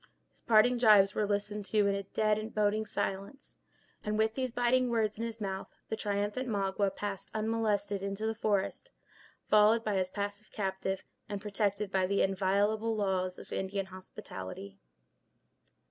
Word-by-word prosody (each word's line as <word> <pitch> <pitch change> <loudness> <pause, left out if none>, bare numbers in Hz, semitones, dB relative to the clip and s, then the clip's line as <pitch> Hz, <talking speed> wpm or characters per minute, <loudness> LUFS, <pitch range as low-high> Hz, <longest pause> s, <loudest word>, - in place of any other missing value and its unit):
His - - -19
parting 235 +2 +4
gibes 210 -4 +6
were 210 - 0
listened 205 +1 -1
to 210 +1 +2
in 200 - +2
a 200 - -1
dead, 215 +2 -1
boding 215 +1 +1
silence, 200 +7 -4 0.5
and, 210 0 -1
with 220 0 +2
these 255 +1 -1
biting 245 +1 +2
words 220 -2 0
in - - -2
his 230 -1 -4
mouth, 190 -2 -3 0.2
the - - -1
triumphant 205 +4 -2
Magua 195 -1 0
passed 200 -2 -4
unmolested 215 -2 0
into 200 +2 -3
the 220 - 0
forest, 215 - -1 0.6
followed 215 +2 +5
by 210 -3 0
his 185 -1 0
passive 205 +2 -5
captive, 190 -1 -2 0.3
and 205 -1 -3
protected 205 -1 -1
by 190 -1 +2
the 200 +1 +2
inviolable 200 +4 +1
laws 190 -3 0
of - - -9
Indian 195 0 -2
hospitality. 100 - -9
205 Hz, 155 wpm, -31 LUFS, 195-220 Hz, 0.6 s, gibes